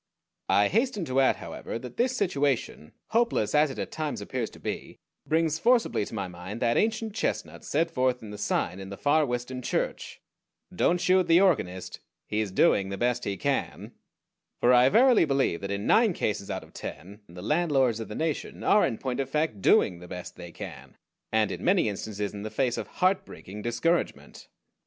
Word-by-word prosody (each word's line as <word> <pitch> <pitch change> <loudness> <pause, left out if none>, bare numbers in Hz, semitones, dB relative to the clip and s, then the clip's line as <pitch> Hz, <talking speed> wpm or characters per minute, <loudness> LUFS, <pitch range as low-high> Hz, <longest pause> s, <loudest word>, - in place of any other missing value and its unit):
I 100 +2 +4
hasten 220 -4 0
to 130 -2 0
add, 135 - +4
however, - - -6
that 125 +1 -9
this 255 +1 +1
situation, 140 - -1 0.2
hopeless 230 - +1
as 150 0 +4
it 135 - -7
at - - -4
times 155 -2 -3
appears 125 -4 -3
to - - -15
be, - - -5 0.3
brings 160 0 +1
forcibly 235 - +2
to - - -8
my 100 -3 -3
mind 90 +5 -8
that 120 -1 +2
ancient 220 0 0
chestnut 220 - -3
set 165 +3 0
forth 130 -4 0
in 105 - -8
the 105 - -7
sign 90 -2 -1
in 95 0 -8
the 100 - -7
Far 150 +1 +2
Western 125 +1 -3
church - - -3 0.6
DON'T 175 - +2
SHOOT 185 0 +3
THE 165 +1 +6
ORGANIST: 95 - 0 0.3
HE 105 - -2
IS 105 -3 -1
DOING 95 +1 +3
THE 100 - -4
BEST 120 +1 0
HE 100 -1 -2
CAN - - -2 0.7
for 125 - +4
I 125 +1 +6
verily 245 - +5
believe 135 - 0
that 100 - -4
in 100 +1 -3
nine 225 -4 +4
cases 105 -8 -2
out - - -3
of - - -18
ten 100 +4 -8
the 90 +1 -10
landlords 135 -5 +2
of 110 - -5
the 105 - -7
nation 160 -2 -3
are 210 - +5
in 115 - 0
point 130 -1 -3
of 135 -1 -2
fact 150 -8 -1
doing 90 -1 +4
the 90 - -11
"best 90 0 -8
they 85 -1 -10
can," - - -10 0.3
and 110 -1 +2
in - - -6
many 185 - +3
instances 105 0 -4
in 100 - -7
the 110 - -4
face 125 0 0
of - - -5
heart 185 +1 +1
breaking 105 +3 -10
discouragement. 120 - -1
125 Hz, 200 wpm, -27 LUFS, 105-165 Hz, 0.7 s, THE